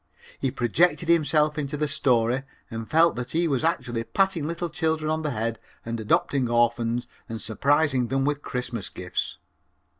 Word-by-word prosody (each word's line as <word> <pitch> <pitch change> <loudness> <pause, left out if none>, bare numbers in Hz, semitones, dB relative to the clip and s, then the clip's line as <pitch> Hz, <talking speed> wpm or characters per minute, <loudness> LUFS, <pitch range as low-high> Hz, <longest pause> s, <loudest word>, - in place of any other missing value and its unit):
He 135 - 0
projected 165 +9 +1
himself 155 -2 +3
into 145 0 -3
the 150 +1 0
story 125 -2 +2 0.3
and 115 0 -5
felt 165 +2 +4
that 125 0 -4
he 170 +1 +2
was 140 -3 0
actually 125 -9 0
patting 190 - +1
little 170 +1 -2
children 160 -2 0
on 160 0 0
the 155 - -1
head 115 -3 -2 0.3
and 115 0 -3
adopting 125 +4 +1
orphans 120 0 +1 0.2
and 115 0 -4
surprising 140 +2 +2
them 135 +2 0
with 145 0 0
Christmas 125 -6 -4
gifts. 90 0 -3
135 Hz, 160 wpm, -25 LUFS, 120-155 Hz, 0.3 s, felt